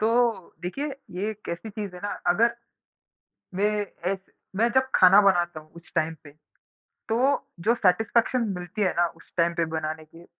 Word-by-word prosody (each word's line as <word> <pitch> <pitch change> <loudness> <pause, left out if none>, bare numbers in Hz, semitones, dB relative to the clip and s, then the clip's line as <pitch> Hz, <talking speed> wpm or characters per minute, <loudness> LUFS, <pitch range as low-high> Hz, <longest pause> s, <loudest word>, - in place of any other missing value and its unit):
तो 230 -3 +1
देखिए, 275 +12 -3 0.2
ये 195 +4 -2
एक 215 0 -8 0.2
चीज़ 205 -3 -6
है 180 - -9
ना, 205 - -2 0.2
अगर 230 +7 +3 1.0
मैं 210 +1 +1 0.3
ऐस 195 - -2 0.4
मैं 230 +3 +3
जब 265 0 +4
खाना 190 +2 +8
बनाता 175 -4 +2
हूँ 155 0 -19
कुछ 170 0 -15
टाइम 160 +1 +1
पे, 145 - -12 0.8
तो 255 +5 +2 0.2
जो 235 - +5
सैटिस्फैक्शन 225 +4 +2
मिलती 180 +5 -4
है 185 - +3
ना 175 0 +4
उस - - -20
टाइम 170 0 +2
पे 170 - +1
बनाने 155 0 -3
की, 165 +2 -16
195 Hz, 165 wpm, -26 LUFS, 175-225 Hz, 1.0 s, खाना